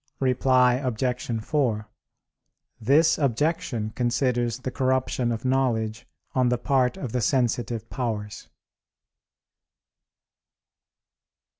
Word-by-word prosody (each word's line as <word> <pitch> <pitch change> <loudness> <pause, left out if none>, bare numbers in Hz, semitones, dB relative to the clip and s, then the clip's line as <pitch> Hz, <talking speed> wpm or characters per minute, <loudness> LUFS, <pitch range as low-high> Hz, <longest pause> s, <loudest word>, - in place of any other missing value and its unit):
Reply 125 -1 +3
Obj. 125 -1 -2
4: 115 -7 0 0.9
This 150 +8 +3
objection 135 -5 0
considers 120 -1 0
the 130 0 -5
corruption 130 -2 0
of 115 +2 -4
knowledge 115 -4 0 0.3
on 130 -1 +2
the 125 - +1
part 125 0 +1
of 125 - -5
the 125 - -1
sensitive 120 -1 0
powers. 110 -5 -4
125 Hz, 90 wpm, -25 LUFS, 115-130 Hz, 0.9 s, Reply